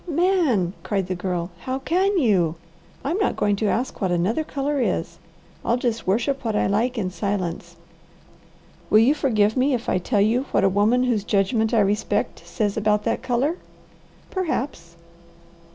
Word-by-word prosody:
"Man!" 320 - +2
cried 195 -3 -1
the 185 - -3
Girl. 180 -1 -3
"How 260 +6 -3
can 370 +8 +1
you? 190 - +2 0.5
I'm 320 +9 -1
not 405 - +1
going 205 -1 +1
to 215 - 0
ask 245 +5 -2
what 190 -2 +1
another 185 - +1
colour 285 -1 -2
is. - - -2 0.4
I'll 235 - +1
just 235 -4 -2
worship 240 +8 0
what 220 -3 -1
I - - +2
like 235 +6 0
in 185 -4 -1
silence." 190 -3 -3 1.1
"Will - - +5
you 235 +6 +5
forgive 220 -8 +1
me 265 +1 +2
if 235 - -5
I - - +1
tell 205 +4 0
you 230 +6 +2
what - - +1
a 195 - +5
woman 210 +6 +2
whose 235 -5 +1
judgment 215 +2 +1
I 230 -3 +4
respect 205 +2 -1
says 210 -4 -1
about 210 -1 +1
that - - -1
colour?" 260 +6 0 0.7
"Perhaps!" 265 - -3
220 Hz, 170 wpm, -23 LUFS, 200-265 Hz, 1.1 s, Will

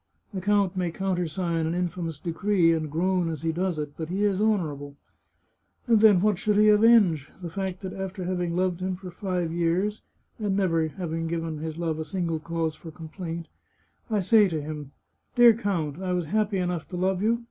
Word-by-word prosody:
The 190 - -3
count 200 -1 +2
may 180 -2 0
countersign 175 -2 -1
an 165 - -1
infamous 175 -3 -3
decree, 175 +1 +2
and 155 -2 -2
groan 175 +2 0
as 160 -2 -5
he 165 - +1
does 180 +1 -1
it, 150 -1 -5
but 160 -1 -5
he 195 +3 -1
is 200 -1 +1
honourable. 150 -10 -1 0.9
And 230 -3 +4
then, 210 -5 +6
what 210 -3 +2
should 210 -1 +1
he 215 0 +6
avenge? 210 -9 +5
The 175 -3 -6
fact 190 0 -4
that 190 -1 -5
after 190 -1 -5
having 180 -1 -2
loved 180 -1 0
him 185 0 -2
for 180 0 -9
five 180 -3 -2
years, 175 +5 0 0.4
and 200 -2 0
never 165 -5 +2
given 165 -1 -3
his 160 0 -5
love 165 -2 -2
a 160 - -3
single 170 -3 -2
cause 165 0 -2
for 165 +1 -11
complaint, 165 +1 -7 0.6
I 215 -3 +1
say 210 +2 +5
to 165 -4 -2
him: 150 -1 -6 0.2
' - - -46
Dear 240 -2 +8
count, 185 -8 -2
I 185 -1 -1
was 180 -2 -1
happy 210 +3 0
enough 180 -3 -2
to 180 - -6
love 185 +1 0
you. 230 +2 +2
180 Hz, 195 wpm, -26 LUFS, 165-195 Hz, 0.9 s, Dear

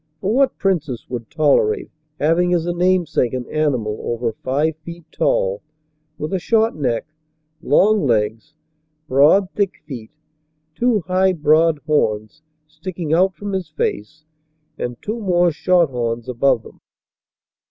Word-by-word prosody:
For 195 +6 -1
what 270 +2 +2
princess 155 - -1
would 120 -3 -6
tolerate 160 - +1 0.3
having 175 +4 +2
as 170 -1 -1
a 175 - -1
namesake 175 -8 +1
an 125 -1 -4
animal 125 -9 -1
over 120 0 -2
five 145 +7 -1
feet 170 +1 -11
tall, 95 +1 0 0.6
with 155 +6 -4
a 190 - +1
short 225 +4 +2
neck, 125 -6 -1 0.6
long 200 +3 +3
legs, 110 +6 -1 0.5
broad, 155 +9 +4
thick 200 -3 -2
feet, 120 -7 -8 0.6
two 235 +1 +1
high 185 +2 +2
broad 155 0 +3
horns 110 -5 0 0.3
sticking 160 0 -5
out 185 +2 +3
from 205 +1 -6
his 185 -4 -3
face, 155 0 -4 0.5
and 120 -1 -5
two 220 +3 -3
more 175 -4 +2
short 170 -1 +2
horns 120 -1 -3
above 125 -1 +1
them - - -16
155 Hz, 135 wpm, -20 LUFS, 125-185 Hz, 0.6 s, broad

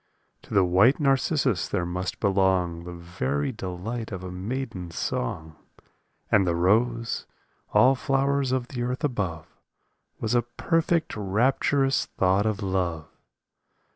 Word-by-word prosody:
To - - -8
the 95 -2 +5
white 100 - +4
narcissus 135 - +1
there 85 - -1
must 90 +1 -4
belong 95 -4 +1
The 90 - -6
very 85 - -2
delight 110 +3 -5
of 95 -2 -5
a 90 - -6
maiden's 95 -3 -5
song. 80 +5 -3 0.8
And 100 -3 +4
the 85 - +1
rose, 115 +6 +1 0.4
all 130 +2 +6
flowers 135 0 0
of 130 -2 -1
the 125 -3 -4
earth 125 +4 -3
above, 95 - -2 0.7
Was 110 +1 -1
a 120 - +4
perfect, 165 +7 0
rapturous 130 +6 +1
thought 95 +3 +1
of 105 -1 -2
love. 90 -5 -2
100 Hz, 130 wpm, -26 LUFS, 90-130 Hz, 0.8 s, all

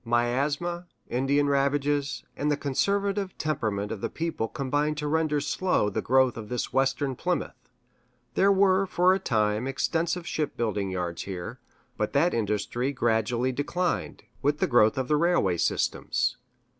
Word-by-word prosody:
Miasma, 140 +9 0 0.2
Indian 140 +3 +2
ravages, 140 0 0
and 145 - -1
the 145 - +1
conservative 200 +7 -1
temperament 110 -9 -2
of 110 -3 -5
the - - -2
people 160 -8 -2
combined 145 +5 -1
to 150 0 -2
render 155 -1 +1
slow 145 - 0
the - - -1
growth 130 -1 +3
of 105 -2 -7
this 125 -1 -3
Western 135 0 +1
Plymouth. 180 +6 -3 0.6
There 200 +1 +4
were, 195 0 +4
for 180 +1 +4
a 190 - 0
time, 110 - 0
extensive 165 +6 -1
ship 155 -4 -2
building 105 -4 -1
yards 90 -2 -3
here; 95 +6 -6 0.4
but 105 +2 -1
that 160 +5 +3
industry 115 +4 -1
gradually 120 0 +1
declined, 170 +7 -2 0.2
with 145 +1 +1
the - - +2
growth 120 -4 +4
of 130 +1 -2
railway 150 - +2
systems. - - 0
140 Hz, 145 wpm, -27 LUFS, 120-160 Hz, 0.6 s, There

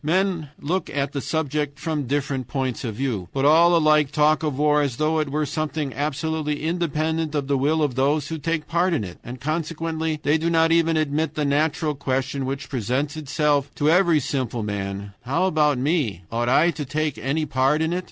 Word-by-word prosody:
Men 175 -1 0
look 170 +4 -2
at 140 0 -2
the 140 - -3
subject 150 -2 -2
from 150 -1 -3
different 135 -2 -1
points 130 -2 -2
of 115 -4 -4
view, 110 -9 -2
but 135 0 0
all 170 +4 +6
alike 155 -3 +4
talk 150 +1 +3
of 150 -4 -2
war 150 0 +3
as 140 -4 -1
though 155 +1 +1
it 150 -2 -1
were 150 +2 0
something 155 -2 -3
absolutely 150 +1 -2
independent 160 -1 -1
of 145 -2 0
the 140 +1 +1
will 150 +4 +2
of 145 -4 0
those 140 +3 +1
who 160 -1 -4
take 165 +1 -2
part 170 +1 +1
in 135 - -1
it. 90 -3 -8
And 125 +2 -8
consequently 160 +1 -2
they 150 +3 +2
do 165 +2 0
not 165 -1 +3
even 165 -1 +3
admit 155 +1 0
the 150 - 0
natural 155 +2 +1
question 135 0 -2
which 135 +1 -4
presents 130 +5 -2
itself 145 -1 0
to 150 +2 +2
every 175 -3 +4
simple 125 -4 -2
man: 100 -1 -4
"How 140 +9 0
about 150 -6 +2
me 125 - 0
ought 120 +1 0
I 165 +6 +4
to 155 - -5
take 150 +1 -2
any 150 +4 -1
part 135 +3 +2
in 160 +2 0
it?" 180 - 0
150 Hz, 200 wpm, -23 LUFS, 135-160 Hz, -, all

